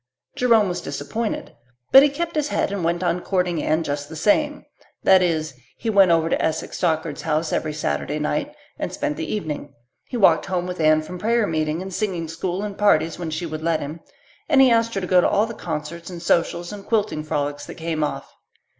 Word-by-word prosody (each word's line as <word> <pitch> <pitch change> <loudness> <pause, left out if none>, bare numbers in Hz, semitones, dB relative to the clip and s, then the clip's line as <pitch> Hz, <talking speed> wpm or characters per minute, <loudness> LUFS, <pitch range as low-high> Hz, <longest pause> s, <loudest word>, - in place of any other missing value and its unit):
Jerome 230 -4 +4
was 180 -1 -3
disappointed, 215 +11 -4 0.4
but 270 - +10
he 290 - +5
kept 335 +4 -3
his 300 -1 +1
head - - 0
and 200 -3 -3
went 170 +2 0
on 180 0 +1
courting 180 -3 0
Anne 160 +2 +1
just 145 -1 -4
the 160 - -8
same; 295 - +1 0.4
that 190 -1 +6
is 160 -4 0 0.2
he 225 - -2
went 195 -3 +6
over 165 -1 +3
to - - 0
Esek 160 0 -2
Stockard's 160 -3 -1
house 155 0 -1
every 155 - -1
Saturday 150 -1 -2
night 150 0 -1 0.3
and - - -3
spent 150 - -2
the 160 - -4
evening, 150 -7 -4 0.3
he 250 - -5
walked 170 -7 +4
home 180 -2 -1
with 180 -1 -5
Anne 155 0 +4
from 180 +3 -8
prayer 230 +3 +2
meeting 155 0 -1
and 190 0 -7
singing 180 -5 -2
school 175 +4 -3
and 205 -2 -6
parties 165 -6 +3
when 170 -2 -3
she 160 +2 -3
would 155 -1 -5
let 165 -1 +1
him, 150 +3 -6 0.5
and 275 -3 +6
asked 230 -3 +3
her 195 - -1
to - - -2
go 180 0 +4
to - - +2
all 205 +2 +3
the 230 - -6
concerts 165 -1 -5
and 175 -2 -8
socials 170 +1 +1
and 200 -1 -10
quilting 215 -8 0
frolics 145 -1 -3
that - - -8
came 160 -2 -2
off. 150 - -4
170 Hz, 215 wpm, -22 LUFS, 155-205 Hz, 0.5 s, but